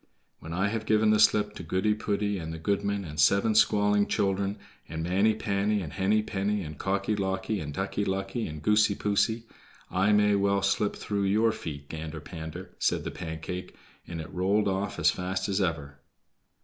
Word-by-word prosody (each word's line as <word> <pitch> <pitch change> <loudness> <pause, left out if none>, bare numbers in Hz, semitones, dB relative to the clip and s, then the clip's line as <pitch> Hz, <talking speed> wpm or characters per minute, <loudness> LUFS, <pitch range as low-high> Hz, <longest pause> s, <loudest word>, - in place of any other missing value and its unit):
"When 80 - -9
I 95 +4 +1
have 110 0 -3
given 110 0 +4
the 110 - +3
slip 105 0 +4
to - - -8
Goody 95 +5 +1
poody, 105 -2 -1
and 80 0 -5
the 80 - -5
goodman, 100 +3 -1
and 75 -1 -7
seven 100 +8 +4
squalling 105 -1 +4
children, 100 -1 0 0.3
and 80 0 -4
Manny 100 +5 +2
panny, 105 0 0
and 80 -2 -7
Henny 100 +4 +2
penny, 105 -1 -1
and 75 -2 -8
Cocky 100 +2 0
locky, 95 +1 -1
and 75 -3 -5
Ducky 95 +5 -2
lucky, 95 +3 -2
and 75 -1 -8
Goosey 105 -1 +4
poosey, 110 +3 +1 0.5
I 95 +3 +2
may 105 0 +4
well 100 0 +2
slip 100 +1 +1
through 100 -1 -2
your 110 +3 +3
feet, 70 -7 -7
Gander 80 0 -6
pander," 80 -1 -8
said - - +1
the - - -4
Pancake, 85 +2 -6 0.3
and 85 -1 -5
it 80 +3 -8
rolled 100 +4 +2
off 100 +1 -1
as - - +4
fast 95 +1 -3
as 100 0 0
ever. 80 -6 -2
100 Hz, 185 wpm, -28 LUFS, 90-105 Hz, 0.5 s, given